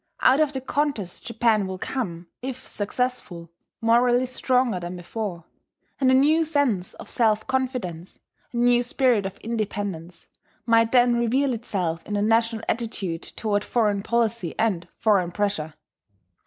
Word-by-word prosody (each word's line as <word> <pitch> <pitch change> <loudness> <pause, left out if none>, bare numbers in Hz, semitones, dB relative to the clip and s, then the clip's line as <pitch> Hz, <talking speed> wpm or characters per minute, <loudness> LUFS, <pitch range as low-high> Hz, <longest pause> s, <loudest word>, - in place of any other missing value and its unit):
Out 265 +3 +6
of 305 -2 +2
the 265 - -3
contest 265 -9 -2
Japan 225 -3 +2
will 190 0 -5
come, 180 -7 -4 0.2
if 260 0 -6
successful, 205 -6 -3 0.3
morally 240 +2 +4
stronger 250 -4 +1
than 175 +1 -6
before; 180 0 -5 0.6
and 265 -2 +3
a 260 - +5
new 305 +5 +4
sense 285 - 0
of - - -11
self 220 -3 +1
confidence, 250 -11 -3 0.3
a 240 - -5
new 240 0 +4
spirit 245 -5 +2
of 195 - -9
independence, 205 -6 -4 0.4
might 230 -1 +4
then 245 -1 +4
reveal 255 +3 +1
itself 185 -8 -3
in 210 - -4
the 205 - +1
national 225 +1 +2
attitude 205 -7 -2
toward 205 -2 -2
foreign 210 -4 +1
policy 230 -5 0
and 185 -6 0
foreign 195 -5 +2
pressure. 180 -6 -1
225 Hz, 140 wpm, -24 LUFS, 190-250 Hz, 0.6 s, Out